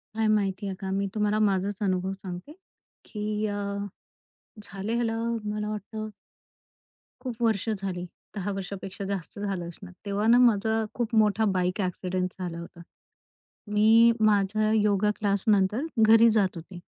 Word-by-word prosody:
काय 220 0 +1
माहिती 200 -2 +1
आहे 190 - -3
का? 190 -2 -4
मी 195 +1 0
तुम्हाला 210 0 +1
माझाच 200 -1 +1
अनुभव 190 -1 0
सांगते, 190 +4 -8 0.5
की 210 0 -3
अ, 205 - -3 1.1
झाले 200 +2 -5
ह्याला, 230 -1 0 0.4
मला 210 0 -3
वाटतं. 215 +1 -5 1.1
खूप 245 -3 -6
वर्ष 220 -2 +1
झाली, 190 -4 -3 0.3
10 205 0 -2
वर्षापेक्षा 195 0 -6
जास्त 195 -1 -5
झालं 195 -4 -3
असणार. 180 +2 -11
तेव्हा 200 +1 -1
ना, 235 +1 +7
माझा 225 -2 +3
खूप 240 -1 -2
मोठा 215 0 +3
बाईक 185 +2 0
एक्सिडेंट 185 0 -2
झाला 175 -2 -4
होता. 170 0 -10 0.9
मी 225 +2 +6
माझा 215 +1 +2
योगा 210 -1 +3
क्लासनंतर 205 +4 +2 0.2
घरी 225 +1 +7
जात 195 -4 +2
होते. 175 +2 -9
205 Hz, 140 wpm, -27 LUFS, 190-215 Hz, 1.1 s, ना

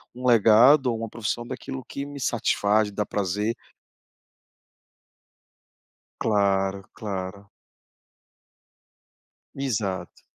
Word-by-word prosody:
um 125 +1 -7
legado 120 +4 +6
ou 115 -2 0
uma 115 0 -5
profissão 115 +2 -3
daquilo 130 +1 -6
que 140 +2 -6
me 145 0 -9
satisfaz, 110 -4 +1
dá 105 +1 -2
prazer. 105 +4 -1 2.7
Claro, 100 -2 +1
claro. 100 -2 -6 2.0
Exato. 100 -10 -3
110 Hz, 80 wpm, -25 LUFS, 100-125 Hz, 2.7 s, legado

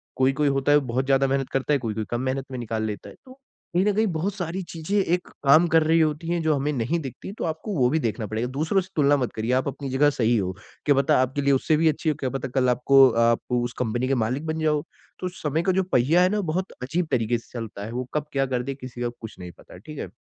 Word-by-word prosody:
कोई-कोई 135 +3 +2
होता 135 +1 +1
है 145 - +6
बहुत 130 +2 +1
ज़्यादा 135 0 +3
मेहनत 135 0 -1
करता 135 +2 +1
है, 140 - +2
कोई-कोई 110 -3 -3
कम 120 +1 -1
मेहनत 130 +1 -2
में 130 - -4
निकाल 110 -1 -3
लेता 105 -2 -5
है - - -13
तो 260 +1 -15 0.4
कहीं 180 - +4
न 210 - +3
कहीं 215 +2 +2
बहुत 185 +5 -1
सारी 180 0 -3
चीज़ें 165 +5 -2
एक 180 -1 -1 0.2
काम 155 +5 +6
कर 165 -1 +4
रही 165 +1 +3
होती 155 +1 0
हैं, 170 0 0
जो 160 -1 +3
हमें 145 +2 -1
नहीं 135 +7 -1
दिखती 135 +6 -7
तो - - -4
आपको 160 +6 -4
वो 125 -2 +3
भी 160 +4 +1
देखना 115 -3 -2
पड़ेगा। 110 +4 -2
दूसरों 165 +6 +2
से 185 - -12
तुलना 145 0 +4
मत 125 -3 -2
करिए 110 +2 -2
आप 130 +2 +1
अपनी 140 0 -4
जगह 140 +3 +3
सही 120 -4 +1
हो। 95 -2 -1 0.3
क्या 145 -2 +4
पता 135 0 +3
आपके 130 +2 -1
लिए 140 0 +3
उससे 150 +4 +2
भी 160 +1 +3
अच्छी 155 +1 -1
हो, 150 - 0
क्या 130 - -1
पता 135 0 -4
कल 130 -1 +3
आपको 130 +2 +6 0.2
आप 115 0 +3
उस 120 0 0
कंपनी 120 +1 -1
के 135 - +1
मालिक 130 +7 -3
बन 160 0 -2
जाओ। 150 -2 +1 0.4
तो 185 - -2
समय 155 +2 0
का 185 - +2
जो 190 +1 +1
पहिया 165 +1 +3
है 185 - +4
ना 210 +1 0
बहुत 185 +2 -2
अजीब 165 +5 -1
तरीके 120 -1 +1
से 115 - -15
चलता 105 -3 -6
है। 110 - -7
वो 125 +1 -2
कब 150 -1 -1
क्या 135 -1 +2
कर 125 -2 -2
दे 135 +2 -4
किसी 130 -2 -9
का 120 - 0
कुछ 110 - -9
नहीं 90 -1 -8
पता। - - -14
ठीक 150 +11 -11
है? - - -4
135 Hz, 275 wpm, -24 LUFS, 125-160 Hz, 0.4 s, है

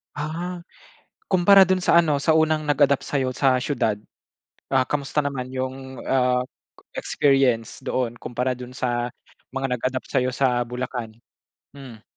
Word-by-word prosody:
Ah, 170 +4 -4 0.7
kumpara 195 +1 +7
dun 185 0 +1
sa 180 - +3
ano 150 -3 +1
sa 155 +3 +2
unang 155 -1 +2
nag-adapt 145 -1 +3
sayo 130 -3 0
sa 130 +1 +2
siyudad, 120 -7 0 0.7
ah, 130 -1 +2
kumusta 140 +1 -4
naman 140 -3 -1
'yong, 130 0 -5
ah, 125 -1 +2 0.5
experience 135 -6 +1
doon 130 -3 -2
kumpara 125 +1 -2
dun 125 0 -9
sa 120 -1 -1 0.4
mga 135 +1 -3
nag-adapt 130 +2 -2
sayo 125 0 +2
sa 125 -1 +1
Bulacan? 125 -3 -5 0.5
Hmm. 130 -6 -12
130 Hz, 135 wpm, -23 LUFS, 125-145 Hz, 0.7 s, kumpara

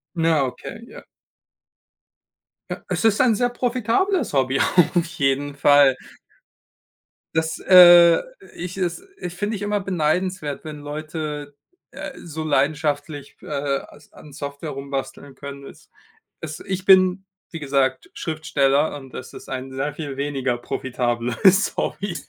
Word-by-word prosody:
Na, 165 -3 +2
okay, 130 - -7
ja. - - -12 1.7
Ja, - - -2
es - - -2
ist 220 -2 +3
ein 250 -3 +4
sehr 245 +3 +1
profitables 250 - 0
Hobby 135 0 +1 0.3
auf 175 -1 +2
jeden 140 -2 -1
Fall. 145 -2 +5 1.4
Das, 160 0 -1
äh 175 -2 +8 0.3
ich 180 +2 -6
es 180 - -2 0.2
ich 175 0 -6
finde 210 +3 -2
ich 200 - -7
immer 205 0 0
beneidenswert, 180 -3 -1
wenn 150 -1 -7
Leute, 150 -1 -6 0.4
äh, - - -7
so 160 -1 -6
leidenschaftlich, 145 -1 -1
äh, - - -13
als 140 0 -4
an 150 -2 -14
Software 145 +1 -6
rumbasteln 140 0 -6
können 140 0 -9
es - - -15 0.5
es - - -6
ich 190 -1 -4
bin, 190 0 +5 0.3
wie 165 - -6
gesagt, 135 -2 0
Schriftsteller 150 -2 0
und 135 -2 -13
das 130 - -8
ist - - -11
ein 130 0 -5
sehr 140 +2 -2
viel 145 -4 -6
weniger 135 -3 -1
profitableres 125 - +1
Hobby. 200 -4 -2
150 Hz, 130 wpm, -22 LUFS, 140-180 Hz, 1.7 s, äh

